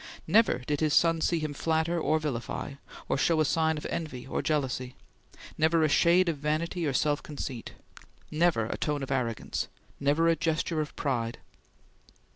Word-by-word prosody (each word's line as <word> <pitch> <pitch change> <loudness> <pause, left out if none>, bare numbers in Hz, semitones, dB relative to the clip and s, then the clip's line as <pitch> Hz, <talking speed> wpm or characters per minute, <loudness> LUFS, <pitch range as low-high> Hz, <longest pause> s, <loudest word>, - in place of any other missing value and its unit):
Never 205 - +3
did 145 +1 -1
his 155 -2 +2
son 165 -1 +4
see 170 - +2
him 155 -2 -3
flatter 160 +3 0
or 155 0 +2
vilify, 140 -2 -4 0.3
or - - 0
show 165 +2 +3
a 155 - +4
sign 160 +1 +1
of 150 - -7
envy 155 -7 -4
or 135 - -2
jealousy; 130 -4 -1 0.6
never 160 +1 +3
a 155 - +3
shade 175 +4 +4
of 165 -3 0
vanity 155 +3 -1
or 140 - 0
self 145 +3 +1
conceit. 135 -5 -6 0.6
Never 155 -7 +2
a - - -4
tone 150 -2 -1
of 135 - -5
arrogance! 120 -4 -2 0.3
Never 145 +4 +2
a 165 - +4
gesture 160 0 0
of 150 - -6
pride! 120 -5 -2
155 Hz, 170 wpm, -29 LUFS, 140-165 Hz, 0.6 s, son